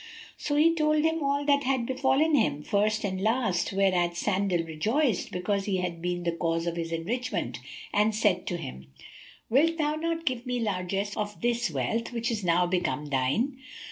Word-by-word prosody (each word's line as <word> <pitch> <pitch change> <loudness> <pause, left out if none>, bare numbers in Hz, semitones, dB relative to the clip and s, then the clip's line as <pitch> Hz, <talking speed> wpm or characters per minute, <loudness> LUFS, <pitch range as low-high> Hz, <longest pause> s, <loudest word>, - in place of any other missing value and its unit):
So 290 - -2
he 320 +3 +5
told 305 -1 +2
him 320 0 +1
all 280 0 0
that 285 -1 +4
had 260 -2 +1
befallen 265 +5 +2
him, 215 - +2
first 210 +3 +1
and 190 -2 -2
last, 220 -4 +1
whereat 180 -3 +2
Sandal 190 -2 +1
rejoiced, 215 - 0
because 195 +2 -1
he 195 -2 0
had 175 -2 -3
been 175 0 -2
the 170 - +1
cause 165 0 -1
of 170 -1 -2
his 165 -1 -4
enrichment, 215 +10 -2 0.3
and 210 +1 +3
said 205 -5 +1
to 175 - -1
him, 65 - -8 0.6
"Wilt 325 +7 +3
thou 300 -2 +1
not 330 +1 -2
give 255 -3 -1
me 250 0 -1
largesse 200 -1 -2
of 210 -1 -4
this 240 0 +1
wealth 230 +2 -2
which 235 0 -2
is 215 -3 -2
now 175 0 +3
become 175 -4 -1
thine?" 145 - 0
210 Hz, 180 wpm, -28 LUFS, 175-265 Hz, 0.6 s, he